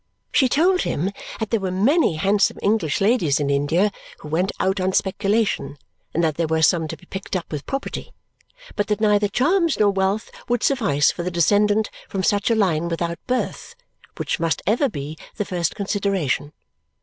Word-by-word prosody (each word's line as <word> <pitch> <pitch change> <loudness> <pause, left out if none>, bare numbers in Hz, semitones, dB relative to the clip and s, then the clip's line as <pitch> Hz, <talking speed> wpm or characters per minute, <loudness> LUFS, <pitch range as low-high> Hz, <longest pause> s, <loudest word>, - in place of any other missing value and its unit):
She 260 -3 +3
told 365 +7 +3
him 180 +7 -1 0.3
that 220 -2 -3
there 225 - +2
were 190 -1 -2
many 210 - +2
handsome 195 +6 +2
English 200 -8 +1
ladies 195 - +2
in 140 -1 0
India 160 +9 +2 0.3
who 150 - -10
went 180 +5 0
out 190 +1 +1
on 185 +1 0
speculation, 195 -8 0 0.3
and 170 - 0
that 155 -2 0
there 165 -1 0
were 160 0 +1
some 165 -1 +3
to - - -6
be - - -19
picked 195 +2 -6
up 180 - -4
with 150 -2 -5
property, 275 0 -4 0.6
but 205 - 0
that 210 -1 0
neither 210 -1 +3
charms 325 - +2
nor 205 -1 +4
wealth 195 +2 -1 0.2
would 245 -1 0
suffice 200 - +3
for - - -6
the 175 - -2
descendant 205 +5 +2 0.2
from 190 -1 -2
such 205 +3 +2
a 230 - +3
line 170 -6 +1
without 170 0 -2
birth, 255 - -2 0.4
which - - -2
must 165 -1 -1
ever 245 +7 +2
be 150 -3 -6 0.2
the 210 - -2
first 175 -4 -2
consideration. 195 -8 -1
195 Hz, 185 wpm, -22 LUFS, 165-215 Hz, 0.6 s, nor